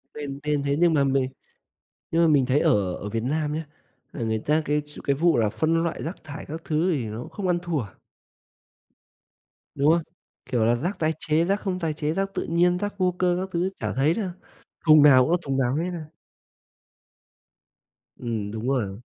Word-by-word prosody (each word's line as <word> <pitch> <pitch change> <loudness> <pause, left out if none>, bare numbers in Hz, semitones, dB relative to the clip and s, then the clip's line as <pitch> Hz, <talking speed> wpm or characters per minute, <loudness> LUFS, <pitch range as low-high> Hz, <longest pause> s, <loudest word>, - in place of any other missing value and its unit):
Nên 140 -2 -5
nên 150 -1 0
thế, 140 0 +1
nhưng 170 -1 +4
mà 140 - +3
mình 135 -1 +1 0.8
nhưng 165 - +3
mà 170 - +5
mình 145 -4 +4
thấy 130 +3 +2
ở 95 -8 +2
ở 105 - -6
Việt 115 +1 -2
Nam 150 +3 -1
nhá, 160 +1 -3 0.5
là - - -6
người 110 -1 0
ta 150 +7 +1
cái 150 0 +1
ch 150 - -12
cái 140 - +2
vụ 165 +1 +3
là 110 -2 +2
phân 165 +6 +1
loại 170 - -3
rác 165 +5 -6
thải 145 -2 -8
các 160 +3 -7
thứ 160 +4 +1
thì 135 -8 -1
nó 110 +3 -6
không 200 -3 -4
ăn 175 -1 +2
thua. 170 -6 -1 1.9
Đúng 145 +3 +4
không? 170 - +2 0.4
Kiểu 120 -4 +1
là, 120 +1 +3
rác 175 +10 -3
tái 155 0 +1
chế, 160 +1 +1
rác 200 +3 +1
không 185 -2 -2
tái 160 -3 -1
chế, 150 0 -2
rác 195 +2 -2
tự 185 - -2
nhiên, 175 +2 +2
rác 205 +1 -4
vô 180 -2 +1
cơ 180 -1 +2
các 190 +1 -4
thứ 175 +2 0
chả - - -2
thấy 140 +5 +2
đâu, 195 0 -2 0.6
thùng 155 -2 +8
nào 130 -3 +7
cũng 160 - 0
là 175 - +4
thùng 135 -4 -2
nào 130 -1 +1
hết 170 +4 -1
a. 155 -3 -7 2.1
Ừm, 110 -4 -3
đúng 110 +3 -4
rồi. 110 -7 -1
150 Hz, 210 wpm, -25 LUFS, 130-170 Hz, 2.1 s, thùng